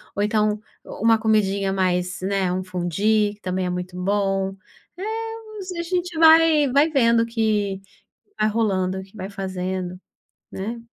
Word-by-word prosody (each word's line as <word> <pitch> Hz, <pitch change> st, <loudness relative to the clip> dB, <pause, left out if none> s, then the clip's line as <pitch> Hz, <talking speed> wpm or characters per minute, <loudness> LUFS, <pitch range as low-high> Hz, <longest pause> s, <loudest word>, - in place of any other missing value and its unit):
ou 205 Hz, -, 0 dB
então 210 Hz, 0 st, +1 dB, 0.3 s
uma 225 Hz, +1 st, +1 dB
comidinha 200 Hz, -3 st, +1 dB
mais, 185 Hz, 0 st, 0 dB
né, 190 Hz, -1 st, 0 dB
um 185 Hz, +1 st, -2 dB
fondue 195 Hz, +4 st, 0 dB
que 205 Hz, -, -32 dB
também 185 Hz, 0 st, -2 dB
é -, -, -1 dB
muito 180 Hz, 0 st, -5 dB
bom. 195 Hz, 0 st, 0 dB, 0.4 s
É, 435 Hz, -3 st, -5 dB
a -, -, -1 dB
gente 355 Hz, -1 st, -2 dB
vai 320 Hz, -3 st, +6 dB
vai 285 Hz, +4 st, +4 dB
vendo 235 Hz, -5 st, +3 dB
que 215 Hz, -4 st, -1 dB, 0.6 s
vai 215 Hz, -, +3 dB
rolando, 190 Hz, -4 st, 0 dB
que 190 Hz, +1 st, -17 dB
vai 190 Hz, -1 st, -5 dB
fazendo, 185 Hz, -2 st, -4 dB, 0.5 s
né. 225 Hz, +5 st, -5 dB
205 Hz, 145 wpm, -23 LUFS, 190-235 Hz, 0.6 s, vai